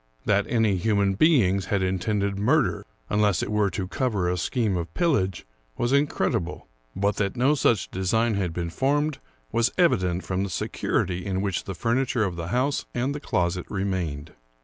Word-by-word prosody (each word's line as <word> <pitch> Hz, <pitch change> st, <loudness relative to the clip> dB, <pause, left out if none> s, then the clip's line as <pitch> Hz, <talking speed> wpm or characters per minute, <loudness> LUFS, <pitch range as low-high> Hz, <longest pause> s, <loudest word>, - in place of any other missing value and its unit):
That 100 Hz, 0 st, +2 dB
any 110 Hz, -5 st, +2 dB
human 100 Hz, 0 st, +2 dB
beings 100 Hz, -, +3 dB
had 100 Hz, -2 st, 0 dB
intended 100 Hz, +2 st, -1 dB
murder, 130 Hz, +6 st, +1 dB, 0.2 s
unless 105 Hz, -3 st, +2 dB
it -, -, -4 dB
were 105 Hz, -1 st, +2 dB
to 95 Hz, +1 st, -4 dB
cover 105 Hz, -4 st, -1 dB
a 90 Hz, -, +1 dB
scheme 105 Hz, +3 st, 0 dB
of 85 Hz, -1 st, -3 dB
pillage, 135 Hz, -, +1 dB, 0.3 s
was 120 Hz, -, 0 dB
incredible; 95 Hz, -, 0 dB, 0.3 s
but 100 Hz, +1 st, 0 dB
that 100 Hz, 0 st, -1 dB
no 130 Hz, +5 st, +4 dB
such 120 Hz, -8 st, +1 dB
design 110 Hz, +5 st, +1 dB
had 95 Hz, -4 st, -1 dB
been 85 Hz, 0 st, -4 dB
formed 145 Hz, -, 0 dB, 0.3 s
was 115 Hz, 0 st, +2 dB
evident 95 Hz, -, +2 dB
from 95 Hz, +1 st, -1 dB
the 100 Hz, -, -3 dB
security 90 Hz, +1 st, -1 dB
in 95 Hz, -1 st, -2 dB
which 100 Hz, -3 st, -2 dB
the 95 Hz, -, -5 dB
furni 120 Hz, +8 st, 0 dB
ture 120 Hz, -, +1 dB
of 95 Hz, -4 st, -2 dB
the 85 Hz, -1 st, -5 dB
house 130 Hz, +8 st, 0 dB
and 130 Hz, +3 st, 0 dB
the 145 Hz, -, -5 dB
closet 90 Hz, -, -1 dB
remained. 90 Hz, -7 st, -3 dB
100 Hz, 175 wpm, -25 LUFS, 90-120 Hz, 0.3 s, no